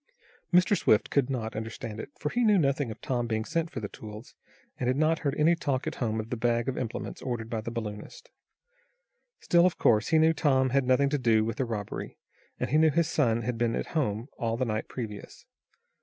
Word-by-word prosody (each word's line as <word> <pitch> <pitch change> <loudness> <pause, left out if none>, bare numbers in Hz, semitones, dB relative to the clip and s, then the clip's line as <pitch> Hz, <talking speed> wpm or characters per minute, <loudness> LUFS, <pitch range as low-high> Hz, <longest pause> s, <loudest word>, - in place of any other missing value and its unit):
Mr. 180 +2 +5
Swift 110 - +2
could 140 -2 +2
not 115 -4 -3
understand 110 0 -5
it, - - -6
for 150 - -2
he 245 +9 0
knew 210 -3 +5
nothing 140 -5 +1
of 110 - -8
Tom 120 -2 -1
being 110 -1 -1
sent 165 +4 -1
for - - -5
the 105 - -3
tools, 105 +2 -10 0.5
and 125 - -1
had 130 +1 +1
not 155 +2 +2
heard 145 -2 -1
any 155 +3 +4
talk 140 -6 -1
at - - -4
home 110 -2 0
of 110 +1 -6
the - - 0
bag 120 +1 0
of 135 - -1
implements 115 -3 -5
ordered 120 -3 -4
by 115 -2 -2
the 110 - -5
balloonist. 110 -3 -7 1.1
Still, 175 +1 +4
of 180 - -2
course, 110 -1 +3
he 160 - +3
knew 160 +1 +5
Tom 130 -4 +2
had 135 -1 +2
nothing 130 +2 +3
to 145 0 0
do 110 -3 +3
with 115 - -3
the 130 - 0
robbery, 105 -4 -5 0.4
and 125 0 -2
he 150 - +4
knew 160 0 +5
his 165 +1 +2
son 115 -7 +1
had 120 0 -3
been 115 -1 +1
at - - -3
home 120 -7 -1
all 115 -1 -1
the 130 - 0
night 110 -1 -2
previous. 105 -5 -7
125 Hz, 225 wpm, -28 LUFS, 110-150 Hz, 1.1 s, Mr